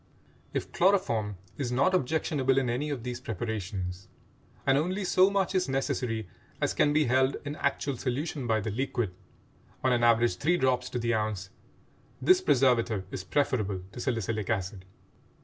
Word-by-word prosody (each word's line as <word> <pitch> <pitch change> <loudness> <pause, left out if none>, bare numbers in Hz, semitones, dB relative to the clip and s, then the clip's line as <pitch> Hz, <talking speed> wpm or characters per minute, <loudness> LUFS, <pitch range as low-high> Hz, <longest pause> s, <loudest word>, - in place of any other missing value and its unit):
If - - -3
chloroform 120 - +2 0.2
is 125 -4 -1
not 140 +9 +3
objectionable 140 -4 +1
in 130 -3 +2
any 140 +5 -2
of 135 -5 -4
these 125 -1 -5
preparations—and 100 +1 -4
only 180 +8 0
so 185 +1 +5
much 200 -2 0
is 185 -6 +1
necessary 125 -5 -1 0.3
as - - 0
can 145 - +3
be 150 +1 +3
held 130 +2 +2
in 145 +1 -4
actual 140 -1 -1
solution 135 +1 -3
by 110 -1 +2
the 110 +2 -3
liquid, 120 -4 -1 0.7
on 130 - +3
an 120 -1 +1
average 120 0 +4
three 165 +5 +2
drops 125 -3 +1
to - - -3
the 120 0 0
ounce—this 110 - -2
preservative 120 - +2
is 95 - -5
preferable 105 -5 0
to 120 - -9
salicylic 115 -4 -2
acid. 95 -3 -2
125 Hz, 150 wpm, -29 LUFS, 110-145 Hz, 0.7 s, so